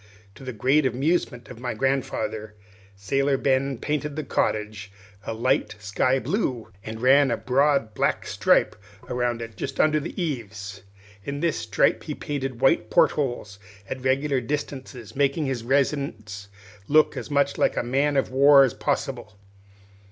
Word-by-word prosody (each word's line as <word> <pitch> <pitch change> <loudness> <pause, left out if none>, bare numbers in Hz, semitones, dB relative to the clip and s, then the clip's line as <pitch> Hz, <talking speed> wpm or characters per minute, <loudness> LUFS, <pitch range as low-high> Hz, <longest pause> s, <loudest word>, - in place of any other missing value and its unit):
To 135 - -14
the 130 - -5
great 135 +6 +2
amusement 130 -2 -1
of 125 - -10
my 125 -2 -4
grandfather, 110 -4 -2 0.4
Sailor 135 +8 0
Ben 135 0 +1
painted 150 +2 -3
the 155 - -3
cottage 105 -6 -2 0.4
a - - -1
light 120 -1 0
sky 105 +6 0
blue, 130 - -2
and 110 +2 -7
ran 135 +2 +5
a 120 - 0
broad 130 -1 +1
black - - 0
stripe - - +2 0.3
around 120 -1 -1
it 115 -1 -10
just - - -5
under 155 0 +4
the 150 - -7
eaves. 105 - -5 0.4
In 140 +4 -4
this 165 0 0
stripe - - +1
he - - -4
painted 135 -4 -4
white 135 - +3
port - - +4
holes, 120 -8 -3 0.3
at 130 -1 -6
regular 135 +1 +1
distances, 130 -4 -5
making 140 +2 +1
his 130 -4 -3
residence 120 -7 -1 0.4
look 155 +1 +4
as - - -6
much 140 -1 +1
like - - +2
a - - +1
man 140 +4 +1
of 135 - 0
war 140 +1 +7
as 130 - +1
possible. 130 -6 -3
130 Hz, 155 wpm, -24 LUFS, 115-140 Hz, 0.4 s, war